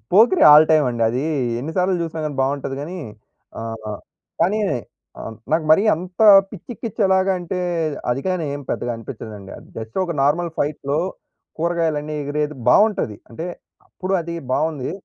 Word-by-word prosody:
'Pokiri' 235 - +6
all 155 +1 +8
టైమండి. 125 -7 +2
అదీ 125 +4 -1 0.4
ఎన్ని 155 +5 -5
సార్లు 185 +1 +2
జూసినా 160 -1 -4
గాని 145 -3 -4
బావుంటది 135 0 -2
గానీ. 175 +5 -6 0.6
ఆహ్, 110 -2 -5 0.4
కానీ, 200 +6 +2 0.6
ఆహ్, 110 - -7 0.2
నాకు 160 0 +2
మరీ 175 +6 +6
అంత 180 +3 -9 0.3
పిచ్చెకిచ్చేలాగా 195 -2 0
అంటే, 180 +2 -4 0.5
అదికాని 165 +6 -1
ఏం 145 - -6
పెద్దగా 120 0 -2
అనిపిచ్చదండి. 105 -3 -9
అది - - -16
జస్ట్ 110 0 -8
ఒక 170 -2 -4
నార్మల్ 165 +5 +1
ఫైట్‌లో 145 0 -1 0.6
కూరగాయలన్నీ 160 -3 -1
ఎగిరేది 150 +1 -2
బావుంటది. 205 - +3
అంటే, 160 +9 -6 0.4
అప్పుడు 185 +1 -5
అది 170 +1 -6 0.2
బావుంది. 155 -3 -1
155 Hz, 135 wpm, -21 LUFS, 135-180 Hz, 0.6 s, all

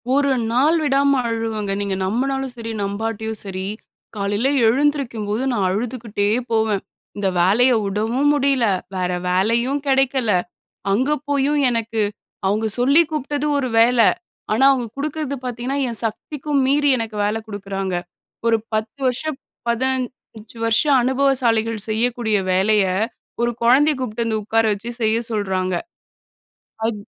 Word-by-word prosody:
ஒரு 280 -1 +3 0.2
நாள் 280 +7 +3
விடாம 280 -1 +3
அழுவேங்க. 225 -3 -2
நீங்க 200 -1 -2
நம்புனாலும் 265 +5 -1
சரி, 230 0 -5
நம்பாட்டயும் 220 +2 -3
சரி. 190 -1 -4 0.5
காலைல 205 +5 0 0.2
எழுந்திரிக்கும் 265 -3 +1
போது 215 +4 -1
நான் 205 -6 0
அழுதுகிட்டே 220 0 -2 0.2
போவேன். 220 -3 +1 0.4
இந்த 200 -1 0
வேலைய 220 +9 +4
விடவும் 225 +8 +1
முடியல. 275 -4 +2 0.3
வேற 180 -1 -1 0.2
வேலையும் 235 +9 +1
கெடைக்கல. 265 -4 +2 0.6
அங்க 255 +8 +1 0.2
போயும் 285 +1 +2
எனக்கு, 230 -2 -1 0.5
அவங்க 215 +3 +1
சொல்லி 280 +6 +5
கூப்பிட்டது 295 0 -2
ஒரு 260 -2 -1
வேல. 235 +1 +4 0.5
ஆனா, 220 +5 +2
அவங்க 250 -3 -2
குடுக்குறது 295 -1 -3
பாத்தீங்கன்னா, 250 +3 -3
என் 230 - -4
சக்திக்கும் 280 +5 -2
மீறி 290 +1 +3
எனக்கு 225 -1 -4
வேலை 210 +2 0
குடுக்குறாங்க. 195 -2 -4 0.5
ஒரு 225 -1 +4 0.2
10 215 +5 -2
வருஷம் 270 +3 -2 0.3
15 245 -3 -3
வருஷம் 260 +5 +3
அனுபவசாலிகள் 240 -5 +1
செய்யக்கூடிய 225 -1 0 0.2
வேலைய, 200 +2 +3 0.6
ஒரு 240 0 +2
குழந்தைய 280 +5 +5
கூப்பிட்டு 235 -2 -2
வந்து 220 -1 -1
உட்கார 225 +2 +2
வச்சு 230 +4 -6
செய்ய 220 0 +2
சொல்றாங்க. 190 -3 -1 1.1
அஃ 230 - +1
230 Hz, 125 wpm, -21 LUFS, 215-270 Hz, 1.1 s, சொல்லி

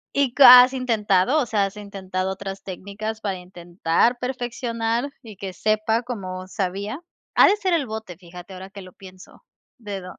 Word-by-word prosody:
¿Y 275 -3 +1
c 280 - +6
has 250 +1 +10
intentado? 230 0 +1
O - - -1
sea, 210 -3 +1
¿has 195 +2 -7
intentado 190 -2 -4
otras 195 0 -7
técnicas 200 +4 -6
para 195 -2 -3
intentar 180 +5 -1
perfeccionar 245 0 -3
y 220 -5 -12
que 190 -1 -7
sepa 215 +4 0
como 185 -6 -6
sabía? 200 - -4 0.4
Ha - - +7
de 400 - +4
ser 375 -4 -1
el 305 -5 +1
bote, 215 -6 -7
fíjate 180 +1 -12
ahora 190 +1 -9
que 200 0 -11
lo 185 -1 -13
pienso, 185 -1 -15 0.3
dedo. 195 -5 -8
205 Hz, 170 wpm, -22 LUFS, 185-240 Hz, 0.4 s, has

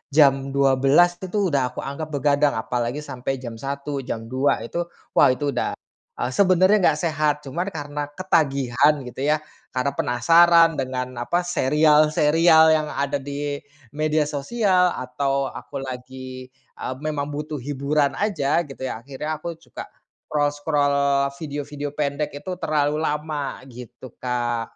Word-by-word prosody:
jam 135 -2 +4
12:00 140 +6 +4
itu 190 - -6
tuh, 195 -3 0
udah 130 -3 0
aku - - -5
anggap 140 +3 -5
begadang, 145 -1 +1
apalagi 120 +5 -2
sampai 130 -1 -4
jam 120 -3 -8
01:00, 140 +1 -4
jam 115 -4 -5
02:00 130 +2 +1
itu, 170 - -4 0.3
wah - - +5
itu 140 +3 0
udah, - - -2 0.5
eee, 125 - -1
sebenarnya 185 +5 +4
enggak 150 - +2
sehat, 155 -2 +1
cuman 170 +7 -3
karena 145 -4 -4
ketagihan 145 -6 +2
gitu, 125 +1 -9
ya, 155 0 +1 0.3
karena 135 +2 0
penasaran 165 +6 +5
dengan 130 -1 -3
apa, 175 +9 0
serial-serial 155 +1 +4
yang 155 -1 -1
ada 140 0 -1
di 145 +1 -4 0.4
media 155 0 +1
sosial, 180 +4 +1
atau 135 +2 -1
aku 140 +1 -7
lagi, 130 0 -8 0.2
eee, - - -4
memang 150 -1 -3
butuh 150 +1 -5
hiburan 140 +2 0
aja 170 -8 +1
gitu, 135 -1 -9
ya, 125 -4 -3
akhirnya 140 +5 -5
aku 170 +1 -5
juga 165 - -10 0.4
scroll-scroll, 145 -2 +1
video-video 145 -1 -5
pendek 145 0 -2
itu 150 +6 -6
terlalu 150 -1 0
lama, 150 -3 -3
gitu 125 +1 -11
Kak. 120 -2 -2
145 Hz, 140 wpm, -23 LUFS, 135-155 Hz, 0.5 s, wah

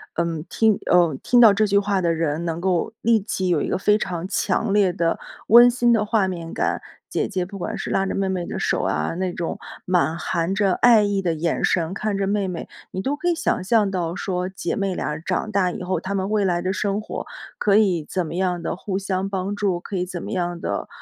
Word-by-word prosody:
嗯 165 -2 -2
听 220 -3 +3
呃 175 -4 +4
听 245 -1 +4
到 220 -4 +8
这 215 +2 +2
句 200 -1 +3
话 200 -1 0
的 170 -2 +1
人 160 0 -1
能 165 0 -3
够 185 +3 0
立 230 0 +4
即 190 -2 -3
有 170 -4 +2
一 - - -2
个 - - 0
非 210 +2 +3
常 180 -4 -4
强 200 +1 0
烈 200 -3 +3
的 170 -2 0 0.3
温 240 +2 +8
馨 240 0 +2
的 220 -2 +3
画 210 -3 +2
面 170 -3 -5
感。 - - -1 0.3
姐 - - 0
姐 185 -4 -2
不 200 +2 -9
管 - - -4
是 - - -5
拉 195 - +1
着 - - -3
妹 195 -1 0
妹 180 -2 -2
的 - - -5
手 - - 0
啊， 75 - -1
那 185 0 -2
种 170 -1 -4 0.2
满 175 -3 +1
含 170 +2 -1
着 195 -1 +2
爱 230 -3 +6
意 205 -1 0
的 175 -3 0
眼 165 +1 -1
神 170 0 0
看 205 +1 -2
着 195 - 0
妹 200 0 0
妹， 180 -3 -6 0.2
你 190 - -3
都 280 +7 -1
可 350 - -3
以 345 - +3
想 - - 0
象 210 -1 +3
到 175 -2 -2
说 180 -2 -2
姐 190 0 -4
妹 195 -2 -1
俩 150 -3 -3
长 185 +6 -2
大 190 -3 +2
以 - - -7
后， 185 +1 -1
她 195 +1 -4
们 190 0 -1
未 210 -2 +1
来 175 -2 +1
的 185 +1 -1
生 200 +1 -1
活 - - -6 0.3
可 200 -1 +2
以 185 -7 +3
怎 180 -2 -1
么 160 - -6
样 180 -1 0
地 - - -3
互 190 0 -3
相 190 -1 -2
帮 195 0 -2
助， 195 -4 0
可 195 - -5
以 180 - -1
怎 180 -1 -6
么 - - -6
样 175 -2 -2
地， - - -3
190 Hz, 265 characters per minute, -22 LUFS, 175-205 Hz, 0.3 s, 到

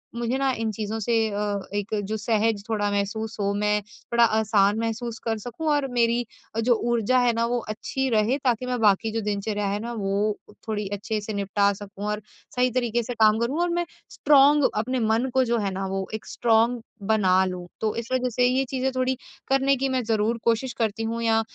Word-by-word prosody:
मुझे 240 +2 -1
ना 270 0 +1
इन 225 -1 -1
चीज़ों 215 +1 -4
से 230 +2 -1 0.2
अ, 205 0 -1
एक 205 +1 -3 0.2
जो 220 - -1
सहज 220 -1 0
थोड़ा 205 -2 0
महसूस 215 +2 -2
हो, 200 0 0
मैं 210 +1 +1
थोड़ा 235 +3 -1
आसान 215 -2 +3
महसूस 230 +1 -3
कर 225 -1 0
सकूँ 245 +9 -6
और 290 -2 +1
मेरी 240 0 +2 0.3
अ, - - 0
जो 240 +2 +3 0.2
ऊर्जा 235 +2 +2
है 245 -1 +3
ना 230 0 +1
वो 240 +1 0
अच्छी 265 +5 -2
रहे। 225 +3 +2
ताकि 250 -1 +1
मैं 250 -1 -2
बाकी 210 +1 +3
जो 225 +1 -2
दिनचर्या 205 0 -2
है 200 +1 -1
ना, 235 +2 -5
वो 205 0 0 0.3
थोड़ी 210 -2 -2
अच्छे 205 +2 -2
से 215 +1 -5
निपटा 200 0 +1
सकूँ 200 0 -8
और 210 0 -2 0.3
सही 250 0 +3
तरीके 240 -1 0
से 245 - -4
काम 220 -1 +4
करूँ। 250 +7 -1
और 350 - +1
मैं 345 0 0 0.2
स्ट्रॉन्ग 290 0 +5
अपने 250 +5 -1
मन 225 +3 +1
को 260 - +4
जो 235 0 +1
है 200 -2 -1
ना 195 +1 -3
वो 190 0 -3
एक 220 - -5
स्ट्रॉन्ग 230 +1 +2 0.3
बना 190 -4 +4
लूँ। 180 -1 -5
तो 220 -1 0
इस 230 0 -4
वज़ह 255 -1 +1
से 245 +1 +2
ये 255 +2 +2
चीज़ें 265 0 -1
थोड़ी 255 0 +1 0.3
करने 270 +1 +3
की 270 +1 -1
मैं 260 -1 0
ज़रूर 220 +1 +1
कोशिश 235 +2 +1
करती 225 -1 -1
हूँ 230 +1 -2
या 225 -1 +3
225 Hz, 210 wpm, -25 LUFS, 210-245 Hz, 0.3 s, स्ट्रॉन्ग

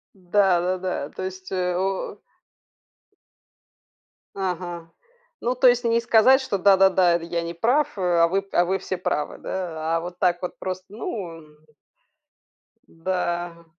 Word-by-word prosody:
Да-да-да. 185 -3 0
То - - -7
есть, 185 0 -7
э, 180 -1 -1
о 190 +1 -2 2.1
Ага. 175 -3 -4 0.5
Ну, 245 +1 0
то 255 +1 +5
есть 245 0 +4
не 230 0 +2
сказать, 235 +4 +5
что: 235 -6 -2
"Да-да-да. 190 -2 +5
Это 170 - -3
я 170 0 -2
не 170 0 -5
прав, 245 - +1
а. 175 -3 +2
А - - +6
вы 195 +3 0
уа 175 - +3
вы 190 +2 0
все 185 - -4
правы". 150 -4 -2
Да? 165 -3 -3
А - - +1
вот 175 +1 -7
так 175 -1 +2
вот 180 - -5
просто. 185 0 -5
Ну, 195 -5 -6
м 150 -1 -17 1.3
Да. 175 -1 -3
180 Hz, 145 wpm, -24 LUFS, 170-195 Hz, 2.1 s, А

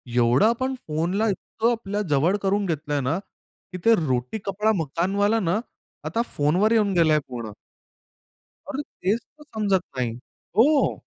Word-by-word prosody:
एवढं 120 - +4
आपण 260 +4 +1
फोनला 170 +8 0
इतकं 220 +4 -1
आपल्याजवळ 195 - 0
करून 200 +1 +1
घेतलंय 150 -4 -1
ना, 140 +6 0
की 185 -2 -15
ते 230 - +7
रोटी, 130 - -1
कपडा, 210 +3 +1
मकानवाला 195 +7 +1
ना 185 0 +1 0.5
आता 230 - 0
फोनवर 175 +9 +2
येऊन 210 -4 +3
गेलाय 160 -3 +4
पूर्ण. 120 -4 -6 1.2
अरे! 290 0 -3
तेच 205 -5 -2
तर 300 +5 -21
समजत 205 - 0
नाही. 125 -2 0 0.5
हो. 280 +6 +3
195 Hz, 135 wpm, -24 LUFS, 155-220 Hz, 1.2 s, ते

